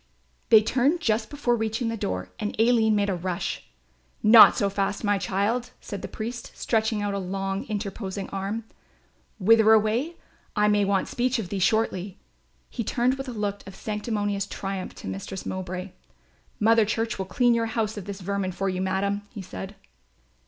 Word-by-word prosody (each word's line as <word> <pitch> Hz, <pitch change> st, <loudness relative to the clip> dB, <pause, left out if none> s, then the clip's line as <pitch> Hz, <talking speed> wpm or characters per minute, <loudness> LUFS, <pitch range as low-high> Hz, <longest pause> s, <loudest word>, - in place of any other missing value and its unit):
They 215 Hz, -1 st, +8 dB
turned 265 Hz, +9 st, +2 dB
just 220 Hz, -6 st, 0 dB
before 275 Hz, -5 st, 0 dB
reaching 225 Hz, +1 st, -1 dB
the 230 Hz, -, -2 dB
door 95 Hz, -, -3 dB
and 210 Hz, 0 st, -4 dB
Aline 225 Hz, -2 st, +4 dB
made 205 Hz, -1 st, +1 dB
a -, -, 0 dB
rush. 180 Hz, 0 st, -3 dB, 0.6 s
"Not 220 Hz, +1 st, +9 dB
so 200 Hz, -, +2 dB
fast, 200 Hz, +1 st, -1 dB
my 205 Hz, -1 st, +2 dB
child," 220 Hz, +7 st, 0 dB
said 200 Hz, -2 st, -7 dB
the -, -, -5 dB
priest, 235 Hz, +2 st, -6 dB
stretching 220 Hz, -2 st, 0 dB
out 205 Hz, -1 st, -1 dB
a 200 Hz, -, -1 dB
long 195 Hz, +1 st, -3 dB
interposing 200 Hz, -2 st, -4 dB
arm. 195 Hz, +4 st, -3 dB, 0.7 s
"Whither 220 Hz, +2 st, +5 dB
away? 225 Hz, +10 st, +2 dB, 0.4 s
I 210 Hz, -1 st, +3 dB
may 205 Hz, -1 st, +3 dB
want 195 Hz, -1 st, +1 dB
speech 250 Hz, +1 st, 0 dB
of 210 Hz, -6 st, -4 dB
thee 200 Hz, -, -2 dB
shortly." 195 Hz, -2 st, 0 dB, 0.5 s
He 235 Hz, -, -4 dB
turned 245 Hz, +4 st, +1 dB
with 270 Hz, 0 st, -5 dB
a -, -, -4 dB
look 205 Hz, -3 st, -3 dB
of 195 Hz, -, -9 dB
sanctimonious 205 Hz, -2 st, -2 dB
triumph 195 Hz, -2 st, -5 dB
to -, -, -9 dB
Mistress 95 Hz, -, -5 dB
Mowbray. 185 Hz, 0 st, -4 dB, 0.7 s
"Mother 225 Hz, +1 st, +5 dB
Church 225 Hz, 0 st, -2 dB
will 190 Hz, -, -1 dB
clean 240 Hz, +5 st, +3 dB
your 230 Hz, -1 st, +1 dB
house 220 Hz, -1 st, -1 dB
of 205 Hz, -2 st, -7 dB
its 200 Hz, -1 st, -6 dB
vermin 195 Hz, 0 st, -2 dB
for 195 Hz, +2 st, -1 dB
you, 185 Hz, 0 st, -2 dB
madam," 195 Hz, +2 st, 0 dB
he 205 Hz, -4 st, -8 dB
said. 190 Hz, +2 st, -7 dB
205 Hz, 175 wpm, -26 LUFS, 195-225 Hz, 0.7 s, Not